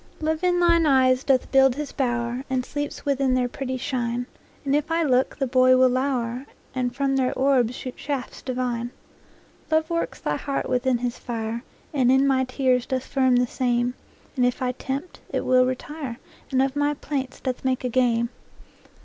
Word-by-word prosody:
Love 315 +2 -1
in 355 -1 +3
thine 335 -2 +4
eyes 260 -2 +4
doth 265 -2 +1
build 270 -2 +5
his 295 0 -4
bower, 240 -1 -1
And 255 -1 0
sleeps 290 +2 -5
within 275 -2 +2
their 250 -1 +1
pretty 260 +1 -4
shine; 245 -2 -2 0.4
And 275 0 +2
if 300 +2 0
I 330 +1 +1
look, 260 -3 +2
the 275 - 0
boy 255 0 +5
will 255 0 +5
lower, 255 0 -1 0.3
And 250 -1 -2
from 275 0 +1
their 255 -1 +2
orbs 260 -3 +2
shoot 255 -1 -6
shafts 280 -4 -4
divine. 245 -2 -2 0.8
Love 315 +1 +1
works 335 0 -2
thy 150 - -1
heart 275 -1 -3
within 255 0 +1
his 240 0 -3
fire, 230 -1 -4 0.3
And 255 -3 +3
in 265 +1 +4
my 260 -1 +2
tears 255 -1 +1
doth 260 -1 -2
firm 260 -2 +2
the 245 0 +3
same; 245 0 0 0.4
And 255 - +1
if 245 0 +1
I 255 -1 0
tempt, 270 +6 -5
it - - -2
will 255 0 +4
retire, 260 -1 -5 0.3
And 265 -1 +2
of 270 0 -1
my 290 0 +1
plaints 270 -3 -4
doth 255 -2 -3
make 260 -1 0
a 250 - 0
game. 235 -1 +2
260 Hz, 185 wpm, -24 LUFS, 250-275 Hz, 0.8 s, build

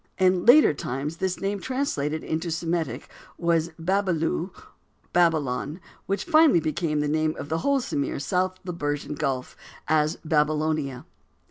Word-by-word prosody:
In 185 +1 +2
later 285 - +8
times 140 +4 -4
this 190 0 -2
name 200 +1 -2
translated 160 - -2
into 160 +2 -2
Semitic 165 -5 -2 0.3
was 170 -1 +1
Babilu—Babylon—which 170 -2 -2
finally 315 - +5
became 155 -1 -1
the 150 - 0
name 155 +1 0
of 145 - -7
the 160 +1 0
whole 280 +8 +2
of 265 - -2
Sumir 140 -9 -2
south 185 +5 0
to - - -28
the 180 - -4
Persian 145 -2 -3
Gulf, 135 -3 -3 0.3
as 155 +1 +2
Babylonia. 150 -3 0
160 Hz, 135 wpm, -25 LUFS, 150-185 Hz, 0.3 s, later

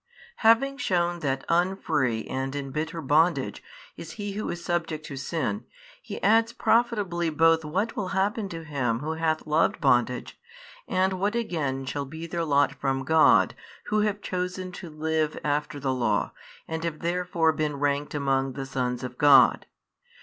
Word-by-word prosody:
Having 245 +5 +4
shewn 175 -7 0
that 135 -4 -2
unfree 165 - +1
and 135 +1 -3
in 140 -1 -4
bitter 160 +3 -3
bondage 160 +5 +2 0.3
is - - -9
he 205 -1 -5
who 210 +2 -4
is 170 0 -5
subject 165 -3 -2
to 145 - -7
sin, 165 +9 -3 0.4
He - - -7
adds 225 +2 +4
profitably 210 -9 +1
both 165 +1 +3
what 190 +9 -2
will 200 - -2
happen 195 +2 -1
to 165 -2 -7
him 130 -6 -1
who 155 +2 -3
hath 160 -1 -1
loved 155 +1 +2
bondage, 125 -3 +1 0.5
and 185 0 +1
what 205 +4 0
again 155 - -2
shall 140 +1 -3
be 160 +4 -8
their 170 0 -3
lot 145 -2 +2
from 135 -1 -2
God 160 +3 +5 0.4
who 215 - +2
have 210 -1 0
chosen 180 0 -3
to 180 -1 -9
live 155 0 -1
after 145 0 -1
the 135 -1 -1
Law 125 -2 0 0.4
and 160 0 -4
have 165 -2 -4
therefore 170 -1 +1
been 150 0 -1
ranked 145 +1 -1
among 135 -2 0
the 135 +1 -5
sons 125 -2 -2
of 125 -1 -7
God. 140 -3 +6
160 Hz, 165 wpm, -26 LUFS, 140-180 Hz, 0.5 s, God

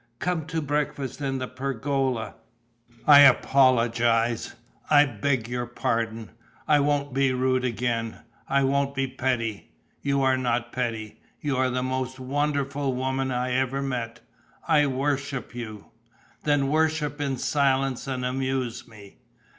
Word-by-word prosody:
Come 170 0 -2
to 160 -1 -2
breakfast 145 -2 -2
in 135 -1 -1
the 130 -1 -3
pergola. 130 -2 -2 0.7
I 145 -1 +9
apologize, 120 -4 +4 0.3
I 145 -1 +7
beg 125 0 -1
your 120 0 -3
pardon. 115 -2 -2 0.4
I 150 -1 +5
won't 145 -1 0
be 135 0 +2
rude 130 0 +1
again, 115 -2 -2 0.3
I 140 0 +3
won't 140 +1 +1
be 135 0 +1
petty. 125 -5 -2 0.3
You 140 -1 +1
are 130 -1 +3
not 120 -1 -1
petty. 115 -4 -4 0.2
You 145 -2 -1
are 130 0 +2
the 125 0 -1
most 130 0 -3
wonderful 140 0 -1
woman 130 +1 -1
I 125 0 -1
ever 130 +2 0
met. 120 -4 -4 0.5
I 150 -3 +4
worship 135 0 -2
you." 110 -4 -8 0.5
"Then 145 -2 +2
worship 155 -1 0
in 135 -2 -1
silence 135 -1 +1
and 130 -2 -2
amuse 130 -2 -2
me." 105 -4 -15
130 Hz, 135 wpm, -25 LUFS, 120-140 Hz, 0.7 s, I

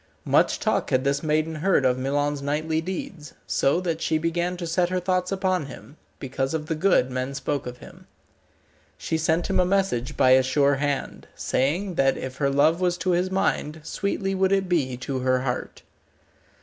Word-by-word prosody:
Much - - +3
talk - - 0
had 130 0 +2
this 140 0 0
maiden 155 +1 0
heard 155 -3 +2
of 125 -1 +3
Milon's 145 +2 -1
knightly 155 +3 -1
deeds, 175 -3 -6
so 140 +5 +1
that 165 -3 -2
she 160 - +1
began 170 +2 -1
to 175 - -5
set 175 +1 +1
her 185 0 0
thoughts 180 0 -1
upon 185 -5 0
him, 140 +2 -12 0.2
because 135 +2 -3
of 155 -1 -3
the 160 - -2
good 155 -5 +2
men 130 +2 -3
spoke 135 -1 -2
of 125 0 -7
him. - - -15 0.9
She - - -3
sent 160 +1 +1
him 190 -1 +1
a - - +5
message 180 -10 0
by 130 -2 +5
a 130 0 +7
sure 140 +2 +2
hand, 145 -1 -3
saying 175 +9 -1
that 135 0 +2
if 130 0 -6
her 140 -2 +1
love 155 +5 +3
was 180 -1 +1
to 185 - 0
his 180 +1 +1
mind, 160 -5 -1
sweetly 195 +3 -2
would 190 0 +1
it 195 -1 +2
be 140 -8 0
to 130 +1 -4
her 130 0 +1
heart. 125 -2 -4
155 Hz, 190 wpm, -24 LUFS, 135-180 Hz, 0.9 s, a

